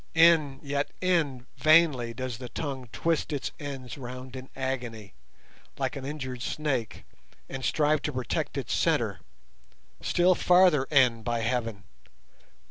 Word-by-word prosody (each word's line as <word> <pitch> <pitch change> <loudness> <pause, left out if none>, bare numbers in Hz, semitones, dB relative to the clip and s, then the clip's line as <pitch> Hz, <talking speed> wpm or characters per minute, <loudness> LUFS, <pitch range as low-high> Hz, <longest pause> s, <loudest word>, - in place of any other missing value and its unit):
In, 165 -5 +5
yet 140 0 -1
in, 155 -9 +1
vainly 155 -7 +4
does 125 0 -5
the 125 -2 -7
tongue 135 -4 -5
twist 165 -1 0
its 145 -3 -2
ends 135 -3 -6
round 130 +1 -8
in 130 0 -8
agony, 120 -6 -4 0.6
like - - -2
an 135 - -6
injured 130 -4 -5
snake, 135 -5 -2 0.4
and 135 0 -6
strive 155 +1 +2
to 150 - -2
protect 125 -2 -2
its - - -2
centre; - - +1 0.8
still 180 +1 +3
farther 180 -6 +5
in, 130 -5 +3
by 120 0 -1
Heaven! 115 -3 -2
135 Hz, 130 wpm, -28 LUFS, 125-150 Hz, 0.8 s, In